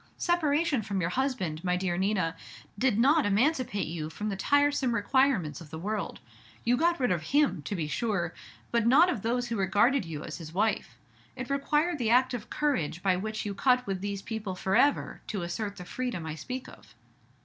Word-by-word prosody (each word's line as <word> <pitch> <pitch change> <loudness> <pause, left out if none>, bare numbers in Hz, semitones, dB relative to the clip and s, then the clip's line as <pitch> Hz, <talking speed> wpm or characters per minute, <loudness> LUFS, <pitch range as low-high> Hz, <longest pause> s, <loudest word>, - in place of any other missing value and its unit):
Separation 315 -5 +1
from 200 -2 -3
your 170 -1 -1
husband, 190 - -1
my 180 -1 +1
dear 180 -1 -1
Nina, 190 -3 0 0.4
did 240 0 +1
not 285 +6 +4
emancipate 235 +1 +1
you 155 -1 -4
from 210 +6 -4
the 200 - -2
tiresome 285 +2 +2
requirements 210 - +1
of 160 - -11
the 160 - -7
world. 205 +4 -3 0.4
You 240 +1 +3
got 340 +5 +2
rid 250 -5 +2
of 175 -3 +1
him, 275 - +2
to 175 +8 -4
be 160 -4 -2
sure, 185 -2 -1 0.4
but 235 -1 +2
not 315 +9 +6
of 225 - -3
those 245 +2 -1
who 230 - -2
regarded 210 +8 +3
you 160 -3 -6
as - - -7
his 160 -1 -9
wife. 215 +3 0 0.4
It 255 +1 -5
required 300 +4 +1
the 230 -3 0
act 255 +2 +4
of 235 -4 -5
courage 175 - -1
by 190 -2 +3
which 215 +4 -3
you 205 - -2
cut 250 +4 +2
with 195 -3 -3
these 200 -1 -4
people 215 -4 -4
forever, 190 +10 +1
to 200 -5 -3
assert 200 +4 -3
the 180 - -9
freedom 245 -7 -4
I 160 - -4
speak 255 +11 -6
of." - - -15
215 Hz, 195 wpm, -29 LUFS, 185-260 Hz, 0.4 s, not